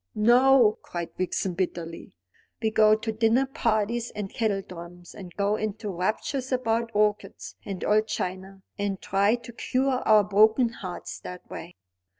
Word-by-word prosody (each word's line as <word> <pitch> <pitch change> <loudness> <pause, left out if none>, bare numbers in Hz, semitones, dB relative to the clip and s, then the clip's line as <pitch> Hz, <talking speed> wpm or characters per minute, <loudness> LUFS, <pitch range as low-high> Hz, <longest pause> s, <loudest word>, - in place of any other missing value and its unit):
"No," 240 0 +5
cried 170 -1 -6
Vixen 185 0 -2
bitterly. 170 - -4 0.4
"We 220 -1 0
go 215 0 +5
to 220 +1 -3
dinner 225 +4 +2
parties 230 -2 -1
and 205 -2 -5
kettledrums, 180 -5 -4
and 185 -3 -10
go 200 +1 +1
into 215 0 -4
raptures 220 +9 -2
about 235 -2 0
orchids 210 -2 -1
and 195 -2 -6
old 215 +1 +3
china, 190 0 -5 0.2
and 200 -1 -2
try 200 +3 +2
to 240 0 -11
cure 255 +2 0
our 215 -1 +6
broken 220 +4 +4
hearts 185 -6 -7
that 180 0 -9
way." 170 +2 -8
210 Hz, 145 wpm, -26 LUFS, 190-230 Hz, 0.4 s, our